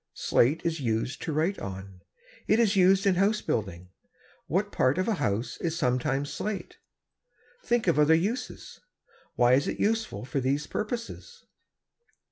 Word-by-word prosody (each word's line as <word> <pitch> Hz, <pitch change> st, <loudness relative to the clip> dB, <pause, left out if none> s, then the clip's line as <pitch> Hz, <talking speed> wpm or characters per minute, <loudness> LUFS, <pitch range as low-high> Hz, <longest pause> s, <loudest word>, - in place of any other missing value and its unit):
Slate 140 Hz, +7 st, +2 dB
is 165 Hz, -1 st, -1 dB
used 115 Hz, +1 st, -2 dB
to -, -, -3 dB
write 160 Hz, +6 st, 0 dB
on. 95 Hz, -1 st, -8 dB, 0.5 s
It 215 Hz, -, +3 dB
is 220 Hz, -3 st, +3 dB
used 190 Hz, +1 st, +4 dB
in 195 Hz, -, +4 dB
house 200 Hz, +4 st, +2 dB
building. 90 Hz, -4 st, -3 dB, 0.6 s
What 200 Hz, +6 st, -1 dB
part 130 Hz, +5 st, +1 dB
of 185 Hz, +3 st, 0 dB
a 225 Hz, -, +2 dB
house 105 Hz, +4 st, -1 dB
is 165 Hz, -1 st, -3 dB
sometimes 135 Hz, +3 st, 0 dB
slate? 210 Hz, -1 st, -5 dB, 0.9 s
Think 240 Hz, -1 st, +1 dB
of 170 Hz, -5 st, +2 dB
other 150 Hz, +2 st, +5 dB
uses. 220 Hz, +10 st, -3 dB, 0.6 s
Why 120 Hz, 0 st, +4 dB
is 140 Hz, +2 st, +3 dB
it -, -, -3 dB
useful 220 Hz, -, -1 dB
for 140 Hz, +2 st, -2 dB
these 135 Hz, +3 st, 0 dB
purposes? 240 Hz, -, -6 dB
160 Hz, 150 wpm, -27 LUFS, 125-205 Hz, 0.9 s, other